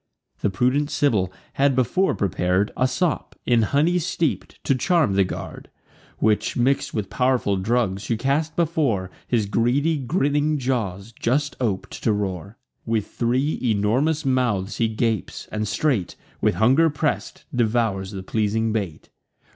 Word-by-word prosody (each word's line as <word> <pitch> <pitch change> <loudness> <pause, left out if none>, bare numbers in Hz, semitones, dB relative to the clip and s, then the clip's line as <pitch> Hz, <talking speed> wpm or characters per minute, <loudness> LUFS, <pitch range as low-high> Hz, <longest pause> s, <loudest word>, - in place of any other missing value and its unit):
The - - +1
prudent 125 +9 +1
Sibyl 105 -13 +1 0.2
had 140 -1 +2
before 130 - +2
prepar'd 95 +1 0
A 130 - +2
sop, 155 +6 -1
in 120 -2 +3
honey 150 +10 +2
steep'd, 170 -2 -2
to - - +2
charm 160 - +2
the 100 0 +4
guard; 90 - -7 0.5
Which, 110 -1 +1
mix'd 135 +3 +1
with 105 -3 -3
pow'rful 125 -6 +1
drugs, 100 -1 0
she 115 +1 -1
cast 145 +6 0
before 145 - 0 0.2
His 115 -4 +1
greedy 135 +9 +1
grinning 145 +1 +1
jaws, 115 -6 -2
just 140 +6 -1
op'd 105 -6 -1
to 115 - +2
roar. 100 +1 -3 0.3
With 110 -2 -1
three 130 +5 0
enormous 125 +8 +1
mouths 120 -7 0
he 115 - +2
gapes; 110 -1 -2
and 105 0 -2
straight, 120 - 0 0.3
With - - +2
hunger 135 +9 +4
press'd, 150 0 -2
devours 110 -5 +1
the 95 -2 -6
pleasing 110 +2 0
bait. 95 -8 -4
120 Hz, 140 wpm, -23 LUFS, 105-140 Hz, 0.5 s, the